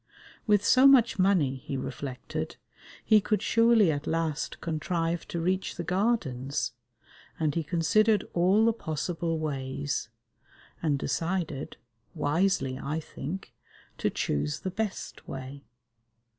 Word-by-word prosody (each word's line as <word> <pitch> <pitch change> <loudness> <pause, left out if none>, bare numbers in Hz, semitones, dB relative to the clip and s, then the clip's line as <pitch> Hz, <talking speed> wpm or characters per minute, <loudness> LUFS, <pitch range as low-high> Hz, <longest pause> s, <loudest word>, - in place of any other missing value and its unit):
With 205 -1 +4
so 255 +4 +7
much 245 -7 +5
money, 180 -9 +3
he 135 +1 -5
reflected, 130 -1 -5 0.5
he 215 -1 +6
could 210 +1 0
surely 230 -5 +5
at 145 0 -4
last 160 -2 -1
contrive 165 +1 -2
to 170 - -3
reach 185 +3 -1
the 170 - -4
Gardens, 150 - 0 0.7
and 155 -3 +1
he 165 - 0
considered 200 +7 +2
all 190 +6 +4
the 230 - +4
possible 165 -3 -2
ways, 140 -3 -3 0.7
and 150 -4 +1
decided 165 0 -2 0.4
(wisely, 150 -3 +1
I 150 +4 -2
think) 160 +4 -7 0.5
to - - +1
choose 75 0 -2
the 185 - -3
best 215 +1 -4
way. 135 +1 -7
165 Hz, 120 wpm, -28 LUFS, 140-195 Hz, 0.7 s, so